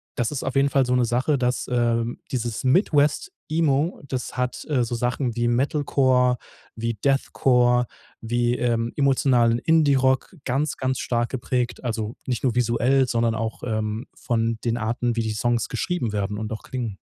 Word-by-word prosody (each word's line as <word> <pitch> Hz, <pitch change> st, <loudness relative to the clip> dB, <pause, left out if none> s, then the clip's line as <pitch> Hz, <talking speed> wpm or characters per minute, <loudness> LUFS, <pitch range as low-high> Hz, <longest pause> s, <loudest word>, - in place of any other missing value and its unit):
das 120 Hz, +3 st, -1 dB
ist 140 Hz, -, -3 dB
auf 135 Hz, -, -3 dB
jeden 140 Hz, +1 st, +4 dB
Fall 135 Hz, -1 st, +2 dB
so 125 Hz, -, 0 dB
'ne 125 Hz, -1 st, +3 dB
Sache, 130 Hz, +5 st, +1 dB
dass, 125 Hz, 0 st, 0 dB
ähm 120 Hz, -1 st, 0 dB
dieses 120 Hz, -2 st, -2 dB
Midwest 150 Hz, -, +2 dB, 0.2 s
Emo, 155 Hz, 0 st, +1 dB
das 130 Hz, -1 st, -4 dB
hat, 125 Hz, 0 st, -2 dB
äh, 135 Hz, -5 st, +2 dB
so 120 Hz, +1 st, -3 dB
Sachen 120 Hz, 0 st, -1 dB
wie 120 Hz, 0 st, 0 dB
Metalcore, 130 Hz, -1 st, +2 dB, 0.4 s
wie 115 Hz, +1 st, -2 dB
Deathcore, 125 Hz, 0 st, +2 dB, 0.4 s
wie, 120 Hz, +1 st, 0 dB
ähm, 115 Hz, -1 st, 0 dB
emotionalen 125 Hz, -4 st, +3 dB
Indie 155 Hz, -2 st, +3 dB
Rock 130 Hz, +4 st, +1 dB
ganz, 140 Hz, +4 st, -1 dB
ganz 130 Hz, 0 st, -1 dB
stark 120 Hz, -1 st, -1 dB
geprägt. 125 Hz, -1 st, -2 dB
Also, 110 Hz, -2 st, -3 dB
nicht 125 Hz, -1 st, -2 dB
nur 125 Hz, -2 st, +1 dB
visuell, 125 Hz, +3 st, +2 dB
sondern 115 Hz, -1 st, +1 dB
auch, 110 Hz, 0 st, -4 dB
ähm, 110 Hz, 0 st, -2 dB
von 115 Hz, -1 st, -1 dB
den 120 Hz, 0 st, 0 dB
Arten, 120 Hz, +1 st, -1 dB
wie 115 Hz, -, +2 dB
die 110 Hz, -1 st, -2 dB
Songs 120 Hz, +1 st, 0 dB
geschrieben 175 Hz, -, -2 dB
werden 105 Hz, 0 st, -2 dB
und 110 Hz, 0 st, -4 dB
auch 110 Hz, -, -7 dB
klingen. 115 Hz, -6 st, -5 dB
125 Hz, 170 wpm, -24 LUFS, 115-135 Hz, 0.4 s, jeden